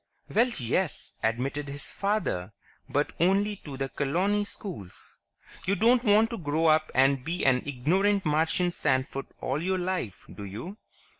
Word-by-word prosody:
"Well, 235 +4 +4
yes," 140 +7 -1
admitted 135 +6 -1
his 140 +1 -7
father. 195 - -1 0.4
"But 145 +1 0
only 200 +4 +2
to 145 -7 -9
the 135 0 -1
colony 185 +10 0
schools. 170 - -7 0.5
You 200 - +3
don't 235 +4 +4
want 220 +1 +4
to 230 - -4
grow 155 0 0
up 155 0 +4
and 135 0 +4
be 170 +4 -2
an 130 -2 +4
ignorant 185 +10 +1
Martian 160 +3 +2
sandfoot 135 -3 0
all 140 +4 -1
your 185 +2 0
life, 180 - -3
do 100 - -8
you?" 120 - -7
160 Hz, 150 wpm, -28 LUFS, 135-195 Hz, 0.5 s, Well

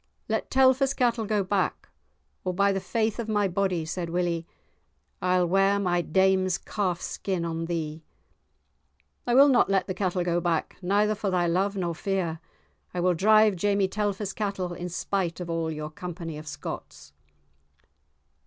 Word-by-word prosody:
"Let - - -1
Telfer's 265 +1 +4
cattle 235 -3 +1
go 210 -2 +1
back, 190 0 -1 0.6
or 185 -1 -2
by 200 +1 +3
the 195 - 0
faith 220 +2 -1
of 225 -1 -3
my 210 -2 +2
body," 185 -3 0
said 170 +1 -4
Willie, 170 -1 -1 0.7
"I'll 180 -1 +2
ware 195 +3 +3
my 180 -3 +1
dame's 190 +2 +2
calf 185 -5 -2
skin 185 -2 -3
on 165 0 -3
thee." 160 -2 -3 1.3
"I 240 - +2
will 275 +2 +8
not 260 -7 +4
let 195 -1 +2
the 185 - -3
cattle 185 -2 -1
go 175 0 0
back 170 -2 -1
neither 205 +3 +2
for 210 -1 -2
thy 180 -2 +1
love 190 +4 +1
nor 175 -3 -1
fear; 175 -2 -2 0.6
I - - -1
will 180 +1 +3
drive 215 +3 +5
Jamie 200 +1 +1
Telfer's 205 0 -2
cattle 195 -4 -3
in 175 +1 -5
spite 180 -1 -2
of 175 -2 -4
all 165 -1 -1
your 155 -1 -5
company 170 -2 -6
of 155 - -11
Scotts." 75 - -8
185 Hz, 160 wpm, -27 LUFS, 170-200 Hz, 1.3 s, will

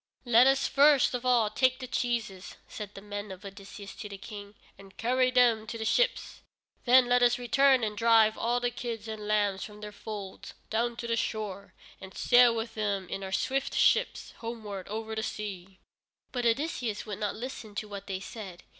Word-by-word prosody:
"Let 240 +1 +6
us 270 0 +3
first 285 -1 +5
of 250 0 -3
all 235 -4 +3
take 255 +3 +2
the 255 - -6
cheeses," 235 -7 -3
said 205 -2 -8
the 195 - -10
men 205 0 -6
of 190 +2 -10
Odysseus 195 0 -10
to 210 - -7
their 200 - -8
King, 205 0 -10 0.2
"and 195 0 -16
carry 255 +2 +2
them 240 -3 +3
to 230 - -5
the 220 - -4
ships. - - 0 0.4
Then 255 0 +7
let 245 0 +3
us 245 0 +4
return 260 +1 +3
and 210 -1 -2
drive 225 0 +4
all 240 +1 0
the 245 0 -1
kids 230 -3 -5
and 215 -1 -6
lambs 205 -2 +1
from 210 -1 -10
their 210 0 -7
folds 205 -2 -8 0.2
down 235 +2 0
to 235 - -6
the 230 - +1
shore, 210 -4 -4 0.3
and 190 0 -11
sail 245 -1 +5
with 225 0 -4
them 200 -3 -2
in 195 - -4
our 190 - -6
swift 270 +7 -1
ships - - +2
homeward 215 -5 -6
over 220 +1 -5
the 220 - -2
sea." 195 -4 -6 0.5
But 245 -2 0
Odysseus 235 -4 -1
would 210 -2 -6
not 210 -2 -2
listen 225 -3 -7
to 215 - -4
what 200 -1 -8
they 190 -1 -3
said. 195 -5 -9
220 Hz, 195 wpm, -29 LUFS, 205-245 Hz, 0.5 s, Then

